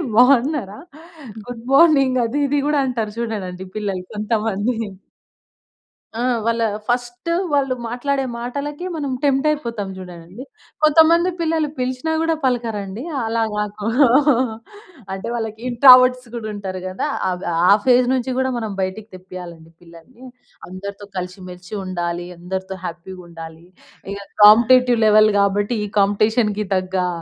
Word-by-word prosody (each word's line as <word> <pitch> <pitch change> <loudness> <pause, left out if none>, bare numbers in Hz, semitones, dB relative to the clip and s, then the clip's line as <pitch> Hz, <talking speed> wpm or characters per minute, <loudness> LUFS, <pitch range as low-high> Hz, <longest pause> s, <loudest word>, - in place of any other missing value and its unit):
బాగున్నారా? 250 -3 +3 0.7
Good 235 -1 -8
morning 275 -5 +5
అది 235 +6 -3
ఇది 290 +1 0
గూడా 295 -1 +2
అంటారు 230 -4 -3
చూడండండి 195 -6 -4
పిల్లలు 195 -3 -3
కొంతమంది. 215 +1 -1 1.5
ఆ! - - 0 0.2
వాళ్ళా 230 0 +1 0.2
ఫస్ట్ 245 +4 -2 0.2
వాళ్ళు 275 -3 +1
మాట్లాడే 270 +3 -2 0.2
మాటలకి 285 +7 -5
మనం 285 -4 -3
టెంప్టయిపోతాం 270 -7 0
జూడండండి. 180 +4 -10 0.4
కొంతమంది 325 +3 +5
పిల్లలు 320 -2 0
పిలిచినా 255 +5 -2
గూడా 325 0 +1
పలకరండి. 225 -4 -2 0.2
అలా 225 +1 -1
కాక 210 0 -3 1.4
అంటే, 195 +2 -6
వాళ్ళకి 220 -1 -4
ఇంట్రావర్ట్స్ 255 0 +6
గూడా 220 -2 -5
ఉంటారు 190 -2 -5
గదా! 185 - -3 0.2
అద్ 180 0 -4 0.3
ఆ - - +9
ఫేజ్ 250 -1 +4
నుంచి 260 0 -1
గూడా 260 0 +1
మనం 220 -3 -4
బయటికి 205 +3 -4
తెప్పియాలండి 175 -3 -11
పిల్లలని. 175 +10 -16 0.4
అందరితో 200 +2 -8
కలిసి 185 +1 -5
మెలిసి 180 +3 -12
ఉండాలి, 175 -1 -3
అందరితో 190 +2 -5
హ్యాపీగుండాలి. 170 -2 -9 0.5
ఇక 200 - -7 0.2
కాంపిటేటివ్ 240 +3 +6
లెవెల్ 215 0 +6
గాబట్టి, 205 +3 +1
ఈ - - -5
కాంపిటీషన్‌కి 210 +1 +1
తగ్గా, 185 -1 -1
220 Hz, 120 wpm, -20 LUFS, 190-255 Hz, 1.5 s, ఆ